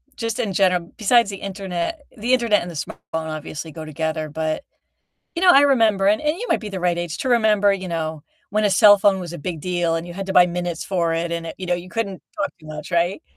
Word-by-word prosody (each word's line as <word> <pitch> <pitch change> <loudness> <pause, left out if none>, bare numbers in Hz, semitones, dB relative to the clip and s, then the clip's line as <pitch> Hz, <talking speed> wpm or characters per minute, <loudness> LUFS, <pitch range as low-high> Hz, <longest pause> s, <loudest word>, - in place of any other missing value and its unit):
just 230 -4 -3
in 200 -4 -1
general 180 -2 +1
besides 230 0 +4
the 195 - -5
internet 195 - -4 0.2
the 235 +4 0
internet 235 -5 +3
and 175 - -6
the 165 - -10
smartphone 150 - -5 0.3
obviously 155 0 -6
go 155 +1 -8
together, 155 0 -3
but, 155 - -2 0.7
you 340 - -2
know, 370 - +6
I 280 -5 +8
remember 225 -8 +3
and 210 +1 +3
and 300 +2 0
you 485 - -4
might - - +2
be 215 - -7
the 195 -2 -5
right 175 -1 +1
age 175 -2 -3
to 260 - -2
remember, 210 -4 +4
you 190 -1 -5
know, 160 -3 -3 0.3
when 215 +1 +1
a - - +4
cellphone 205 0 +6
was 175 -2 -6
a - - -6
big 165 +1 -4
deal 175 -2 0
and 165 +1 -4
you 175 - -8
had 195 +2 -5
to 190 - -2
buy 180 -1 +7
minutes 175 -1 -3
for 170 -4 0
it 165 +1 -2
and 170 0 -3
it - - -7
you 185 - -6
know, 180 - +1
you 175 +1 -5
couldn't 200 -2 -3 0.2
talk 295 -2 0
too 155 - -15
much, 155 +3 -8
right? 170 +2 +1
185 Hz, 250 wpm, -22 LUFS, 170-210 Hz, 0.7 s, I